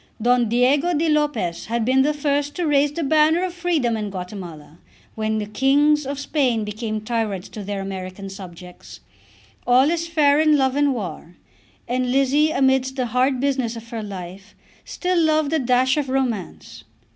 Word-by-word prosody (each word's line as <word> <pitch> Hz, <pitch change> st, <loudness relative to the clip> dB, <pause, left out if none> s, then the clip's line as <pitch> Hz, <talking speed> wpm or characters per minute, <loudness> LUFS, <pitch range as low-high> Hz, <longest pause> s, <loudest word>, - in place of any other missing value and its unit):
Don 240 Hz, 0 st, +2 dB
Diego 275 Hz, +9 st, +2 dB
di 320 Hz, +3 st, +1 dB
Lopez 295 Hz, -, -1 dB
had 230 Hz, 0 st, -1 dB
been 260 Hz, +2 st, +3 dB
the 290 Hz, +3 st, +2 dB
first 290 Hz, 0 st, -1 dB
to 350 Hz, -, -2 dB
raise 290 Hz, -1 st, +2 dB
the 325 Hz, +3 st, -4 dB
banner 315 Hz, +4 st, +3 dB
of 365 Hz, -, -5 dB
freedom 335 Hz, -10 st, 0 dB
in 210 Hz, -2 st, -3 dB
Guatemala 180 Hz, -5 st, -8 dB, 0.3 s
when 220 Hz, 0 st, -2 dB
the 210 Hz, -, -2 dB
kings 280 Hz, +6 st, +2 dB
of 280 Hz, 0 st, -4 dB
Spain 270 Hz, -5 st, 0 dB
became 215 Hz, +1 st, -4 dB
tyrants 215 Hz, -4 st, -3 dB
to 210 Hz, -, -8 dB
their 200 Hz, 0 st, -4 dB
American 190 Hz, 0 st, -6 dB
subjects. 180 Hz, -2 st, -11 dB, 0.7 s
All 255 Hz, +5 st, +4 dB
is 335 Hz, 0 st, -2 dB
fair 300 Hz, -3 st, +3 dB
in 310 Hz, -1 st, +4 dB
love 265 Hz, -1 st, +1 dB
and 285 Hz, -2 st, +2 dB
war, 180 Hz, -5 st, -7 dB, 0.5 s
and 250 Hz, 0 st, -1 dB
Lizzie 275 Hz, +3 st, +3 dB
amidst 265 Hz, -2 st, +1 dB
the 255 Hz, -2 st, -1 dB
hard 255 Hz, +1 st, +2 dB
business 260 Hz, -4 st, -1 dB
of 230 Hz, 0 st, -10 dB
her 230 Hz, -1 st, -4 dB
life 195 Hz, -1 st, -9 dB, 0.3 s
still 360 Hz, -1 st, -1 dB
loved 310 Hz, -1 st, +1 dB
a 320 Hz, -, +2 dB
dash 255 Hz, +1 st, +2 dB
of 285 Hz, -3 st, -1 dB
romance. 250 Hz, -8 st, -3 dB
255 Hz, 170 wpm, -21 LUFS, 215-290 Hz, 0.7 s, All